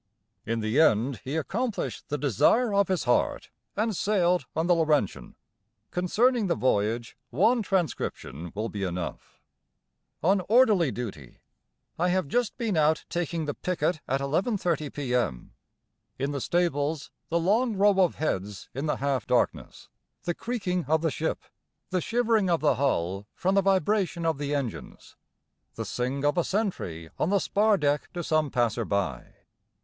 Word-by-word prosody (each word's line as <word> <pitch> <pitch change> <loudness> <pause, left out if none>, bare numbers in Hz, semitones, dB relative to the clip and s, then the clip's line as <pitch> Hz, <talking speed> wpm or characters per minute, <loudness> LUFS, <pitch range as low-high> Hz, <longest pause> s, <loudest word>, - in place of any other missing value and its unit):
In 115 0 -1
the 110 +6 +1
end 125 -2 +2
he 135 +4 -4
accomplished 225 - -3
the 150 - -1
desire 175 - +3
of 200 0 +3
his 185 -3 0
heart, 125 - 0 0.3
and 215 0 0
sailed 180 -7 +1
on 160 +2 +1
the 175 - +4
'Laurentian'. 155 - 0 0.6
Concerning 220 +5 +2
the 170 - +1
voyage 115 -2 0
one 220 - +3
transcription 160 - -2
will 110 +2 -2
be 105 -3 -6
enough: 90 -2 -5 0.8
On 190 +3 +3
orderly 215 - +5
duty. 95 - -7 0.6
I 180 +1 +2
have 185 -3 +1
just 240 - 0
been 230 -6 -1
out 155 0 +2
taking 170 -2 -2
the 145 - -2
picket 180 -2 -1
at 135 +2 0
11.30 165 - 0
P.M. 125 - -2 0.6
In 140 +2 -1
the 140 -2 -3
stables 155 -3 0 0.2
the 170 - +1
long 215 +7 +2
row 200 0 +4
of 180 -3 +3
heads 100 - -3
in 135 +5 -3
the 150 - +1
half 135 -5 -1
darkness, - - -1 0.4
the 175 - -1
creaking 185 -6 -2
of 160 +1 +2
the 160 - +1
ship, 160 +3 -2 0.5
the 185 -1 +1
shivering 225 -2 +1
of 170 -2 +2
the 150 - +3
hull 100 -7 -1
from 190 +2 0
the 195 - +4
vibration 190 -2 +1
of 160 -3 0
the 145 0 -1
engines, 135 -5 -6 0.6
the - - -4
sing 130 +3 -2
of 145 +4 +2
a - - +2
sentry 95 - -3
on 160 - +1
the 200 - +3
spar 205 +2 +2
deck 145 -2 0
to 175 -1 -4
some 155 -2 +1
passer 120 -2 0
by. 100 - -2
160 Hz, 155 wpm, -27 LUFS, 130-190 Hz, 0.8 s, orderly